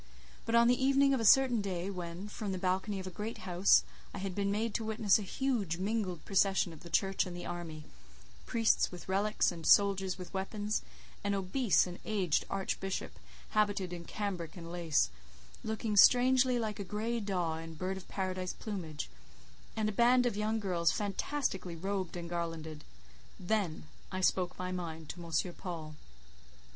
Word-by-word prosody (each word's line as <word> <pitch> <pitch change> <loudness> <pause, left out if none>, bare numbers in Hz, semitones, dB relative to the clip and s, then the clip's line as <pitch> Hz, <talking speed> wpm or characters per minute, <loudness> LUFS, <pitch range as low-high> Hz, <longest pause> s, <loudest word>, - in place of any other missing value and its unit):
But 230 - +1
on 235 0 +6
the 250 +2 +3
evening 275 +1 +4
of 265 - +1
a 225 - -1
certain 250 0 +6
day 190 -1 -3
when, 180 +1 -6
from 210 -1 -4
the 190 - -2
balcony 190 +2 -1
of 190 - -6
a 185 - -5
great 210 +5 -5
house, 180 +1 +5 0.3
I - - -5
had 190 -1 -3
been 200 +1 0
made 215 +2 -1
to 225 - -1
witness 220 -2 +3
a - - -4
huge 210 -5 -1
mingled 190 -3 -2
procession 195 -3 +2
of 160 - -12
the 170 - -10
church 195 +2 +1
and 175 -1 -6
the 175 - -6
army—priests 150 - -2
with 180 -1 -9
relics, 200 +3 +2
and 170 -2 -8
soldiers 195 +1 +4
with 180 -2 -9
weapons, 205 +2 -2 0.4
an 200 0 +1
obese 195 +4 +2
and 180 -1 -7
aged 190 -7 +1
archbishop, 195 0 -3 0.3
habited 205 -4 +1
in 170 -1 -7
cambric 185 -6 -4
and 170 -1 -8
lace, 165 - +1 0.5
looking 220 0 -2
strangely 250 +3 +6
like 215 -3 -2
a - - -2
grey 215 +5 -2
daw 180 -6 -1
in 165 0 -8
bird 185 +4 -2
of 190 - -10
paradise 185 -1 -3
plumage, 175 -8 -5 0.7
and 220 -1 0
a - - 0
band 245 +4 +4
of 240 - 0
young 215 +2 0
girls 175 -5 +1
fantastically 200 - -2
robed 190 0 -3
and 170 -1 -5
garlanded—then 165 - -4 0.3
I 185 0 -2
spoke 180 -1 +1
my 185 0 -3
mind 165 -4 -5
to 175 - -6
M. 170 +2 -1
Paul. 165 -5 -6
190 Hz, 170 wpm, -32 LUFS, 175-215 Hz, 0.7 s, on